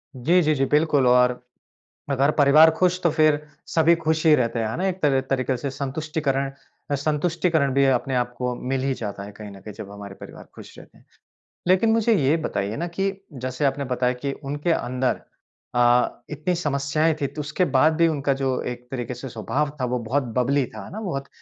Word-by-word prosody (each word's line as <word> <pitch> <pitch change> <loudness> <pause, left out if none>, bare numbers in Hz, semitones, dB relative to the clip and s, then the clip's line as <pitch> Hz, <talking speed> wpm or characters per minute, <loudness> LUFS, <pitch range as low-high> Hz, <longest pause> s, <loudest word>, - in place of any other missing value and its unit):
जी, 165 +9 +3
जी, 155 -2 +2
जी। 135 -1 +1
बिल्कुल 150 -2 +2
और 125 0 +4 0.7
अगर 140 +2 +3
परिवार 150 +2 +7
ख़ुश 180 0 +2
तो 170 - +4
फ़िर 155 -1 +3 0.3
सभी 165 +1 +4
ख़ुश 160 0 -1
ही 155 - +7
रहते 115 -3 0
हैं, 110 - 0
है 110 - -4
ना? 185 - -1
एक 185 - -1
तर 140 -3 +3
तरीक़े 130 -1 0
से 140 +3 -3
संतुष्टिकरण 140 0 -2 0.4
अ, - - +3
संतुष्टिकरण 155 0 0
भी 140 +1 +4
अपने 130 0 +1
आप 125 0 -1
को 125 -1 -2
मिल 135 -1 0
ही 135 0 +1
जाता 100 -5 -6
है 100 - -9
कहीं 105 0 -10
न 100 - -12
कहीं 105 +1 -9
जब 100 0 -9
हमारे 100 -1 -9
परिवार - - -11
ख़ुश - - -12
रहते - - -17
हैं। - - -24 0.6
लेकिन 190 +5 +4
मुझे 225 +1 +3
ये 150 -4 +3
बताइए 105 -9 -3
ना 170 - -2
कि 195 0 +1 0.2
जैसे 130 +1 -4
आपने 140 0 0
बताया 125 -1 0
कि 140 - 0
उनके 145 +5 -2
अंदर 125 -3 -1 0.5
अ, 120 0 +3
इतनी 155 +4 -1
समस्याएँ 155 0 0
थीं, 140 - +1
तो 150 - -8
उसके 150 +5 0
बाद 155 +5 +5
भी 165 0 +4
उनका 145 -3 0
जो 135 -1 -1
एक 120 0 -12
तरीक़े 125 -2 -4
से 125 +2 -7
स्वभाव 130 +6 -2
था - - +1
वो 125 0 -1
बहुत 140 +4 +1
बबली 135 +2 +2
था, 110 -2 -7
है - - -11
ना? 215 - -5
बहुत 140 -10 -4
140 Hz, 210 wpm, -23 LUFS, 125-155 Hz, 0.7 s, परिवार